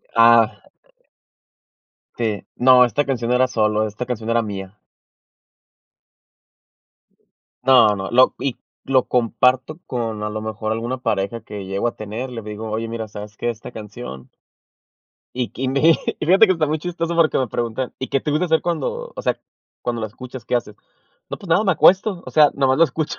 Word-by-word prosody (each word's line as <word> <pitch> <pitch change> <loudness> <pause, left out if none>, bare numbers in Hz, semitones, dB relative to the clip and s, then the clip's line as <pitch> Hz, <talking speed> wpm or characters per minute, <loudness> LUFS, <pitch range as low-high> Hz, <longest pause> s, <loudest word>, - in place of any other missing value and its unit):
Ah. 115 -1 +5 1.6
Sí. 110 -4 -2
No, 125 0 +6
esta 145 +4 0
canción 125 -3 -2
era 130 +1 +3
solo, 110 -2 +1
esta 105 +4 -6
canción 115 -3 -4
era 115 0 +3
mía. 100 -1 -7 2.8
No, 125 -6 +6
no, 95 -1 -5
lo 130 +2 +5
y 135 -3 -2 0.3
lo 130 -2 +3
comparto 125 +5 +1
con 115 -4 -3
a 105 - -2
lo 110 0 -5
mejor 110 0 -4
alguna 115 +3 -2
pareja 105 -2 -2
que 100 -2 -8
llego 95 +5 -1
a - - -14
tener, 110 +5 -6
le 115 - -6
digo: 105 +1 -7
"Oye, 115 +1 -2
mira, 115 -1 -5
¿sabes 105 0 -9
qué? 120 - -2
Esta 115 +1 -7
canción" 105 - -9 1.0
.Y 125 -1 -2
que 130 - -8
y 130 - 0
mi 140 +5 +4 0.3
y - - -2
fíjate 190 +6 +6
que 190 - +3
está 165 -4 0
muy 155 +2 -1
chistoso 170 0 -3
porque 165 -2 +4
que - - +1
me 130 - 0
preguntan: 120 +3 -3
"¿Y 130 - -4
qué 135 - 0
te 150 - -3
gusta 155 +5 +1
hacer 160 -1 +2
cuando 485 - -3
o - - -6
sea, - - -1 0.4
cuando 120 -1 -2
la 110 - -2
escuchas? 125 +2 -10
¿Qué - - -2
haces?". 105 -4 -2 0.5
"No - - -5
pues 195 - -12
nada, 185 +6 +3
me 190 - +3
acuesto, 185 +2 +4
o - - -8
sea, 150 -2 +5
nomás 135 -1 +2
lo 165 - +7
escucho". 155 +1 -3
120 Hz, 185 wpm, -21 LUFS, 110-140 Hz, 2.8 s, lo